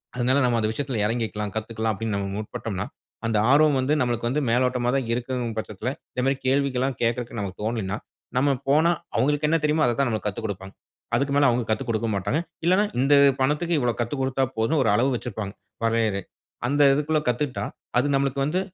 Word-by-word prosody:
அதனால 130 +3 +2
நாம 120 -2 +2
அந்த 110 - +1
விஷயத்தில 135 -5 -2
இறங்கிக்கலாம், 105 -3 -2
கத்துக்கலாம் 110 0 -2
அப்படின்னு 110 0 -2
நாம 100 -1 -3
முற்பட்டோம்னா, 105 -2 -4 0.4
அந்த 110 -2 +1
ஆர்வம் 145 -1 +5
வந்து 140 +4 +1
நம்மளுக்கு 120 -1 0
வந்து 150 +4 0
மேலோட்டமா 125 0 +2
தான் 130 -4 -2
இருக்குதுன்கிற 120 -2 -3
பட்சத்தில, 110 +3 -4 0.2
இந்த 125 - -1
மாதிரி 135 0 +2
கேள்விகள்லாம் 135 -1 +1
கேட்கறதற்கு 115 -1 -1
நமக்கு 100 -1 -6
தோனலைணா, 105 -3 -2 0.4
நம்ம 140 +1 +3
போனா 155 +4 +5 0.3
அவங்களுக்கு 145 +5 +2
என்ன 165 - +3
தெரியுமோ 155 +1 +3
அததான் 120 +2 +1
நமக்கு 110 -1 -2
கத்துக்கொடுப்பாங்க. 100 -2 -6 0.4
அதுக்கு 140 0 0
மேல 145 0 +5
அவங்க 120 +1 +1
கத்து 110 0 0
கொடுக்க 115 0 0
மாட்டாங்க. 100 - 0 0.3
இல்லைன்னா 185 +4 +4
இந்த 135 +2 +4 0.3
பணத்துக்கு 150 +5 +1
இவ்வளவு 120 -2 -1
கத்துக் 125 +4 -2
கொடுத்தா 130 0 +1
போதும்னு 125 +8 +2
ஒரு 110 - +2
அளவு 130 +5 +2
வெச்சிருப்பாங்க, 110 -4 -4 0.3
வரையறை. 115 -3 +1 0.5
அந்த 145 +2 +2
இதுக்குள்ள 150 +2 +1
கத்துக்கிட்டா, 125 +2 -1 0.3
அது 145 +3 +1
நம்மளுக்கு 135 0 +1
வந்து 175 +5 0
125 Hz, 175 wpm, -24 LUFS, 110-140 Hz, 0.5 s, ஆர்வம்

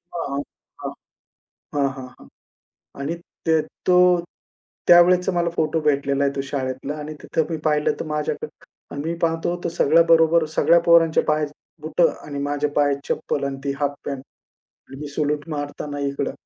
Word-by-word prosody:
हां. 140 -4 -2 1.3
हां, 140 -1 +2
हां. 130 - -11 0.7
आणि 145 +4 -2 0.3
ते 160 -1 +4 0.3
तो 180 - +5 0.9
त्यावेळेचा 180 +2 +6
मला 175 -1 +1
फोटो 160 0 +1
भेटलेला 140 -2 +1
आहे, 140 - +1
तो - - 0
शाळेतला 130 +1 -3
आणि 150 +1 -6
तिथं 160 - 0
मी 165 - -1
पाहिलं 150 -1 +2
तर - - -2
माझ्याकडं 150 -1 -2 0.5
आणि 140 - -4
मी 170 - -1
पाहतो 165 +1 0
तो - - 0
सगळ्याबरोबर 165 +1 +5
सगळ्या 170 - +5
पोरांच्या 165 -1 +5
पायात 150 -1 +1 0.3
बुटं 165 +2 +2 0.2
आणि 145 -1 -5
माझ्या 145 +1 -1
पायात 145 -1 +2
चप्पल 140 - -1
आणि 135 -1 -3
ती 140 - 0
हाफ 145 -1 0
पॅन्ट 140 -2 -4 0.7
आणि 135 +1 -10
मी 150 - -5
सॅलुट 150 +1 -2
मारताना 145 -1 -5
इकडं. 140 0 -3
150 Hz, 150 wpm, -22 LUFS, 140-165 Hz, 1.3 s, त्यावेळेचा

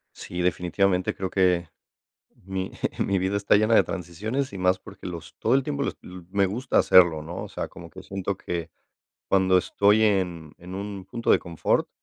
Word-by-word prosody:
Sí, 90 0 -5
definitivamente 90 +1 +1
creo 95 -1 -4
que 90 -3 +2 0.8
mi 95 0 -4 0.3
mi 100 -1 +1
vida 95 +2 0
está 100 0 +3
llena 110 +2 +3
de - - +7
transiciones 105 - -4
y 95 - -6
más 90 0 +2
porque - - -10
los 85 -2 -8
todo 115 +4 +2
el 135 - 0
tiempo 140 -1 -2
l - - 0
l 90 0 -10
me 100 0 +2
gusta 120 +7 0
hacerlo, 85 -4 +6
¿no?, 85 +3 -6
o - - -9
sea, - - -4
como 85 -1 -12
que 95 +1 -11
siento 95 0 -3
que 85 -2 -5 0.6
cuando 95 -1 +4
estoy 105 +4 +3
en 90 -7 0
en 90 +2 -8
un 100 -1 -6
punto 115 +3 0
de - - +4
confort, 85 -2 0
95 Hz, 190 wpm, -25 LUFS, 90-100 Hz, 0.8 s, de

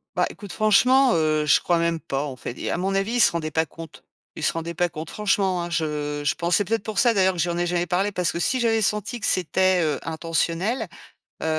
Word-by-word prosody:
Bah, - - +2
écoute, 205 -3 -10
franchement, 250 +5 +4
heu, 155 -1 +1
je - - +4
crois 175 - +1
même 170 -1 0
pas, 140 -3 -3
en 135 -3 -6
fait. 125 0 -7
Et - - -3
à - - -1
mon 190 +2 -1
avis, 195 +4 -1
il 245 - +1
se - - +6
rendait 160 -2 -3
pas 160 +2 +1
compte. 165 0 -12 0.3
Il 160 - -7
se - - +2
rendait 165 +1 -5
pas 175 +1 0
compte, 155 +1 -7
franchement, 195 -4 0
hein. 175 - -5
Je 150 -2 -2
je - - +1
pense, 170 +1 +1
c’est 205 - 0
peut-être 225 0 -1
pour 215 -2 -3
ça 235 -1 +4
d'ailleurs 190 -2 +3
que - - -6
je 175 +1 +1
lui 170 - -2
en - - -3
ai 175 - 0
jamais 175 0 0
parlé, 190 +3 0
parce 180 -3 -1
que 170 - -3
si 255 +8 +1
j'avais 225 -2 +2
senti 210 +3 -1
que - - -2
c'était, 185 +1 +2
heu, 150 -3 -1
intentionnel, 170 +7 -1 0.5
heu, - - -3
175 Hz, 265 wpm, -23 LUFS, 160-205 Hz, 0.5 s, se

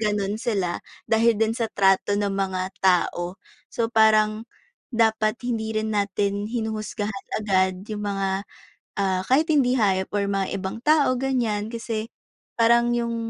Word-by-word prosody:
ganon 210 0 -1
sila 190 -7 -1 0.2
dahil 225 0 +3
din 225 +1 +1
sa 230 -2 -2
trato 195 +1 +2
ng 200 -1 0
mga 190 -1 -2
tao. 180 -1 +1 0.3
So, 230 0 -2
parang 220 0 +3 0.4
dapat 220 -1 +1
hindi 220 -2 -2
rin 215 0 -2
natin 200 +1 -1
hinuhusgahan 215 -3 -4
agad 190 -2 0
yung 210 -1 -5
mga, 195 0 -1 0.6
ah, 190 -1 +1
kahit 310 +5 +3
hindi 260 -4 +3
hayop 190 -5 +1
or 200 - +1
mga 195 -1 0
ibang 190 +3 -4
tao 300 +1 +3
ganyan, 235 -6 -1
kasi, 225 -1 -4 0.5
parang 235 +1 +4
yung, 235 -1 -1
215 Hz, 140 wpm, -24 LUFS, 195-230 Hz, 0.6 s, parang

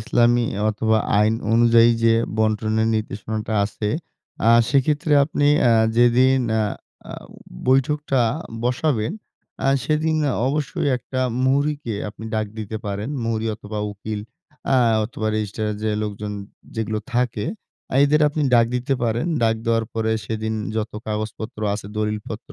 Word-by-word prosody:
ইসলামী 120 +2 +3 0.2
অথবা 110 +1 +1 0.2
আইন 105 +1 +3 0.2
অনুযায়ী 115 0 +6
যে 115 0 +5 0.2
বন্টনের 110 0 +1
নির্দেশনাটা 110 0 -3
আছে 105 0 -3 0.6
আ - - +7 0.2
সেক্ষেত্রে 145 +3 +2
আপনি 145 0 0 0.2
আ - - +5 0.3
যেদিন 125 +2 +5 0.2
আ - - +2 0.5
আ - - -6 0.5
বৈঠকটা 135 +1 +2 0.4
বসাবেন 125 0 0 0.5
আ - - +3 0.2
সেদিন 155 +2 +1 0.3
অবশ্যই 150 +2 -1
একটা 130 +1 -5 0.2
মুহুরিকে 140 -2 0
আপনি 105 +2 -10
ডাক 110 -1 0
দিতে 110 0 -4
পারেন। 100 +3 -3
মুহুরী 115 -1 -1
অথবা 105 0 -7
উকিল 105 +1 -5 0.5
আ - - +5 0.3
অথবা 110 -1 -4
রেজিস্ট্রারের 105 0 -2
যে 110 - 0
লোকজন 105 0 -4 0.4
যেগুলো 110 -1 -1
থাকে 120 -3 0 0.5
আ - - -2
এদের 150 +2 +3
আপনি 150 +1 -2
ডাক 115 -1 +5
দিতে 125 +3 -1
পারেন। 115 +5 0 0.2
ডাক 115 -1 +3
দেওয়ার 115 -1 +1
পরে 110 0 0
সেদিন 110 0 -3 0.2
যত 110 0 -2
কাগজপত্র 110 +1 -4
আছে, 105 -1 -6
দলিলপত্র 105 +4 -4
115 Hz, 135 wpm, -22 LUFS, 110-130 Hz, 0.6 s, আ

